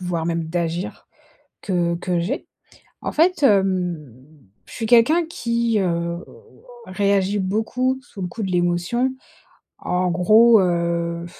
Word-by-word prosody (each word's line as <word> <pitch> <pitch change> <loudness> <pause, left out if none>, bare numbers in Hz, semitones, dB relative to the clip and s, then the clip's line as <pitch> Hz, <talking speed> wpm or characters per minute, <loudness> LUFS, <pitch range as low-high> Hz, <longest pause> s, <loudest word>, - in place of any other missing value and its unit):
voire 175 -3 -3
même 170 -1 -1
d'agir 170 +2 -4 0.6
que 175 -3 0
que 175 0 -2
j'ai. 215 - -3 0.6
En - - -3
fait, 345 +1 +2
hem, 185 - +1 0.6
je - - -15
suis 225 - -4
quelqu'un 250 +9 +4
qui, 235 -7 -1
heu, 195 - +1
heu, 170 0 -2 0.6
réagit 200 +1 0
beaucoup, 225 +7 -1
sous 200 -5 -10
le 180 - -3
coup 220 +5 -7
de 190 - -2
l'émotion. 175 +9 0 0.6
En 180 0 -1
gros, 215 +6 +5
heu, 170 -1 -1
185 Hz, 130 wpm, -21 LUFS, 170-230 Hz, 0.6 s, gros